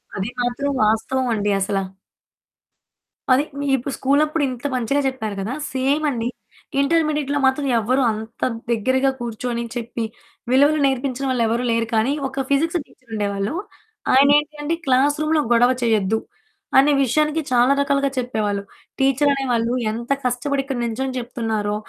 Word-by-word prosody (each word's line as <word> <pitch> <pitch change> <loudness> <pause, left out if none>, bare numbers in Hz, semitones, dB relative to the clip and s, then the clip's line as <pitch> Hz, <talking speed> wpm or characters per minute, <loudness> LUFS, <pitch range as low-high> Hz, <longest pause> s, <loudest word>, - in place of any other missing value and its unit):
అది 195 +4 -2
మాత్రం 245 +4 -1
వాస్తవం 245 +4 +1
అండి 205 -1 0
అసల. 195 +1 -1 1.5
అదే 265 +3 +5 0.2
మీ 285 - -2
ఇప్పుడు 265 +3 -5
స్కూలు 280 +3 +2
అప్పుడు 305 0 -1
ఇంత 250 +2 -8
మంచిగా 255 +4 0
చెప్పారు 220 -6 -3
కదా! 215 +6 -3 0.2
సేమ్ 275 +4 +1
అండి 235 -3 -2 0.5
ఇంటర్మీడియేట్‌లో 295 -2 +1
మాత్రం 265 +2 +2
ఎవరు 255 +5 +1
అంత 220 +1 -7 0.3
దగ్గరగా 260 +4 +2
కూర్చొని, 235 0 -3
చెప్పి, 235 -1 -4 0.5
విలువలు 290 +4 +4
నేర్పించిన 270 0 -1
వాళ్ళెవరు 235 0 +1
లేరు. 230 0 +1
కానీ, 230 +6 +2
ఒక 270 0 -3
ఫిజిక్సు 325 +5 +2
టీచరుండేవాళ్ళు 210 -2 -4 0.6
ఆయనేంటి 290 +3 +4
అంటే 310 +3 0
క్లాస్ 270 +3 +3
రూమ్‌లో 310 0 +2
గొడవ 240 +2 +5
చేయొద్దు, 220 -2 +2 0.6
అనే 285 +2 +6
విషయానికి 305 +5 +1
చాలా 250 +2 +4
రకాలుగా 280 0 +1
చెప్పేవాళ్ళు. 215 -5 -1 0.4
టీచరనే 275 +1 +2
వాళ్ళు 235 +1 +1 0.2
ఎంత 235 +3 -5
కష్టపడి 270 +3 0
ఇక్కడ 270 -3 -3
నించొని 255 +3 -2
చెప్తున్నారో! 220 -4 -2
255 Hz, 135 wpm, -21 LUFS, 230-280 Hz, 1.5 s, అనే